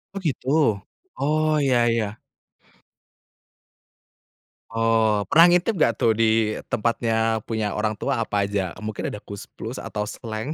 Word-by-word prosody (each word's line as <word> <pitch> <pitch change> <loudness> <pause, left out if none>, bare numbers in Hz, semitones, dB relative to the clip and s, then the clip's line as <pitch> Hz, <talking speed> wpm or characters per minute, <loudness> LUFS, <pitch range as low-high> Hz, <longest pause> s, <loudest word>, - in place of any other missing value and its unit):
Oh, - - -2
gitu. 135 -4 -3 0.7
Oh, 155 +1 +1
ya 125 -4 +3
ya. 110 -2 -2 2.5
Oh, 115 -2 +2
pernah 165 +2 +8
ngintip 180 +2 +2
nggak 115 - +3
tuh, 115 - +2
di 110 -1 +1
tempatnya 115 0 0
punya 110 -2 -2
orang 105 +1 -1
tua - - -2
apa 100 -1 0
aja, 100 -3 -2
mungkin 110 -1 -4
ada 105 - -7
Koes 100 -1 -9
Plus - - -7
atau 105 - -4
Slank? 110 +5 -5
115 Hz, 130 wpm, -23 LUFS, 105-130 Hz, 2.5 s, pernah